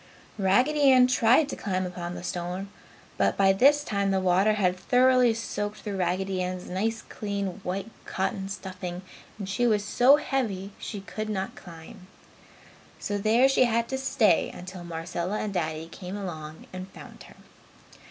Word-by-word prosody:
Raggedy 265 +9 +4
Ann 255 -1 +7
tried 250 +3 +4
to - - -4
climb 185 -2 -2
upon 175 -1 -5
the - - -7
stone, 180 +2 -4 0.5
but - - +2
by 195 -1 +5
this 285 +8 +5
time 200 -6 -1
the 195 -1 +2
water 190 +3 +3
had 185 -4 +1
thoroughly 250 +5 +4
soaked 210 -2 -4
through 205 -3 -4
Raggedy 185 +1 -1
Ann's 180 0 -4
nice, 220 +5 -2
clean, 200 -2 -4
white 195 +4 -4 0.2
cotton 190 0 -2
stuffing 185 -2 -6 0.3
and 200 -3 -6
she 240 +5 +1
was 210 -2 +1
so 250 +6 +6
heavy 220 -10 -2
she 205 -3 -6
could 215 +2 -5
not 195 -2 -3
climb. 170 +1 -12 0.9
So 205 0 -3
there 225 +5 +4
she 270 -1 +4
had 235 0 +1
to 265 - -1
stay 255 -9 +2
until 180 0 -9
Marcella 170 +3 -4
and 210 -2 -3
Daddy 160 -2 -2
came 180 +3 -7
along 160 -5 -7
and 185 0 -6
found - - -13
her. - - -16
195 Hz, 160 wpm, -27 LUFS, 180-225 Hz, 0.9 s, Ann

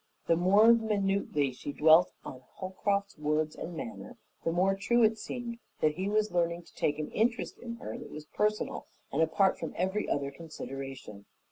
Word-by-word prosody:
The 165 - +4
more 200 +7 +6
minutely 200 - +1
she 135 +3 -7
dwelt 160 +4 +6
on 130 - -8
Holcroft's 200 0 -2
words 150 +1 0
and 165 0 -6
manner, 240 +5 -7 0.3
the 165 - +1
more 185 +3 +3
true 235 +4 +2
it 220 0 +3
seemed 235 +1 -5 0.2
that 155 -1 +3
he 190 +5 -2
was 215 0 +1
learning 170 0 0
to - - -20
take 145 -1 0
an 155 - -4
interest 230 +2 0
in 235 -1 -6
her 110 - -7
that - - -9
was 150 0 -8
personal 210 +5 -1 0.2
and 150 - +1
apart 185 +4 +3
from 165 - -5
every 190 +4 0
other 140 -1 -1
consideration. 135 -8 -8
180 Hz, 175 wpm, -30 LUFS, 150-210 Hz, 0.3 s, more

